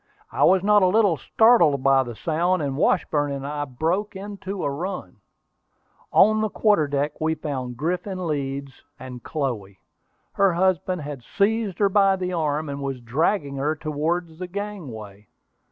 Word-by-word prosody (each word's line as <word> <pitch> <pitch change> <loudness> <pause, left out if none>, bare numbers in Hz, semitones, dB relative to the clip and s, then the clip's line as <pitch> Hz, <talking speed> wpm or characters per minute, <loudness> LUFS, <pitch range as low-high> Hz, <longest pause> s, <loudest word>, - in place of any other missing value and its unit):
I - - 0
was 190 0 +4
not 210 0 +5
a 185 - +5
little 200 -2 +3
startled 170 - +4
by 135 -1 +5
the 120 -3 -6
sound, 170 +5 0
and 140 -2 -2
Washburn 145 0 +1
and 140 -1 -4
I 145 0 -3
broke 165 +11 -2
into 195 -1 -6
a - - 0
run. 165 - -5 0.9
On 215 +2 +5
the 215 - 0
quarter 205 -8 +2
deck 145 +2 -2
we 160 0 +1
found 130 -6 -5
Griffin 180 - -3
Leeds 140 -3 -3 0.3
and 130 -3 -9
Chloe. 120 -12 -4 0.6
Her 195 -2 +3
husband 180 -1 0
had 145 -3 -6
seized 205 - 0
her 200 -2 +3
by 195 -1 +4
the 185 -1 -3
arm, 155 -2 -1
and 140 0 -5
was 135 -2 -3
dragging 140 - -1
her 150 +3 0
towards 160 +2 -3
the 180 - -4
gangway. 135 - -7
160 Hz, 160 wpm, -23 LUFS, 140-190 Hz, 0.9 s, not